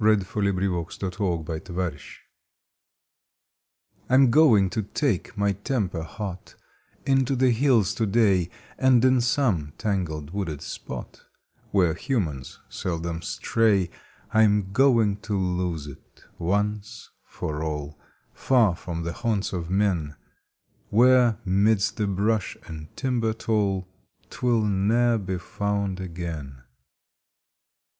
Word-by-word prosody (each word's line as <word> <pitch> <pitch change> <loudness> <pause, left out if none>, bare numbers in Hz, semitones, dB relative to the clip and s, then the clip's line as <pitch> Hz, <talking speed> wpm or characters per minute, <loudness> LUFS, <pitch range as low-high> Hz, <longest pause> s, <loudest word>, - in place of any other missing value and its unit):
July 110 0 +6
Fifteenth 100 0 -1
A 90 0 -2
RESOLUTION 85 -2 -2 2.1
I - - -1
M 130 -2 +6
going 115 -9 +6
to 110 - -1
take 105 - -2
my 100 0 +2
temper 100 - -2
hot 95 +2 -7 0.5
Into 135 -1 +2
the 130 0 +3
hills 120 -5 +3
to 110 - -1
day, 100 -5 +3 0.3
And 130 -2 +5
in 130 -1 +4
some 110 - +1
tangled 85 -8 -2
wooded 85 -7 -4
spot - - -8 0.5
Where 90 -5 +3
humans 80 - -3
seldom 85 -1 -4
stray 100 0 +1 0.4
I 110 - +5
m 105 -3 +3
going 115 -5 +4
to 105 -1 -3
lose 90 -4 -1
it 70 -2 -14 0.2
once 105 +3 -2
for 75 -1 -5
all 75 -1 -4 0.3
Far 115 -9 +3
from 85 -1 -5
the 85 0 -3
haunts 110 -5 -1
of 85 -2 -4
men, 90 -6 0 0.7
Where, 120 0 +5
midst 100 +2 +2
the 105 -2 0
brush 100 +2 0
and 80 -2 -8
timber 120 -4 0
tall, 100 -4 0 0.4
Twill 120 -3 +1
ne 100 +1 +1 0.2
er - - +2
be 95 -2 -3
found 100 +1 -2
again. 80 -7 -6
100 Hz, 120 wpm, -25 LUFS, 85-110 Hz, 2.1 s, July